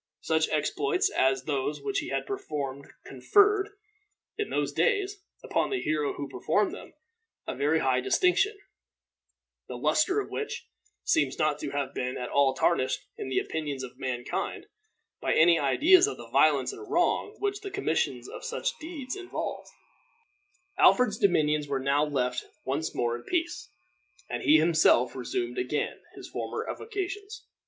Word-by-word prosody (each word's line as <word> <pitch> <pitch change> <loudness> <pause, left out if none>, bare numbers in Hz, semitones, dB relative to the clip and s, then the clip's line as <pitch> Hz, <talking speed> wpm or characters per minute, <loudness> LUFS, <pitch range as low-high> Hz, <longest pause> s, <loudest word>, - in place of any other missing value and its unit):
Such 160 0 +1
exploits 395 - +1
as 130 0 +2
those 145 +1 -2
which 400 -1 -1
he - - -5
had - - -2
performed 140 - -4 0.2
conferred, 405 - +3 0.7
in 425 -1 -3
those - - -1
days, 400 0 +1 0.2
upon - - 0
the 395 - -1
hero 150 - 0
who 140 - -5
performed 160 +11 0
them, - - -10 0.5
a - - -3
very 155 +3 +1
high 130 -1 +2
distinction, 390 - +2 1.1
the - - -6
luster 395 +1 +2
of 410 - -5
which 435 - -4 0.4
seems 325 - +1
not 155 -2 +1
to - - -4
have 140 -1 -3
been 125 0 -3
at 125 - -4
all 140 -2 +3
tarnished 130 0 +1
in - - -6
the 130 - -1
opinions 145 -4 -2
of 130 - -9
mankind 125 -1 -3 0.6
by - - +1
any 165 +1 +6
ideas 345 - +5
of 420 - -4
the - - -11
violence - - +3
and 405 0 -10
wrong 415 +1 +1
which 405 0 -2
the 400 - -5
commission 400 0 -1
of - - -8
such 485 +1 -2
deeds 305 -6 -6
involved. 370 -2 -5 1.1
Alfred's 245 -4 +5
dominions 150 - +2
were 140 -1 -1
now 140 +2 +2
left 125 -4 -1 0.2
once 145 +4 -2
more 120 -1 0
in 120 - -7
peace, 345 - -2 0.6
and 120 - -4
he 155 - +6
himself 155 -6 +4
resumed 120 -1 -3
again 125 +4 -2
his - - -9
former - - -4
avocations. 405 0 -5
160 Hz, 155 wpm, -28 LUFS, -, 1.1 s, any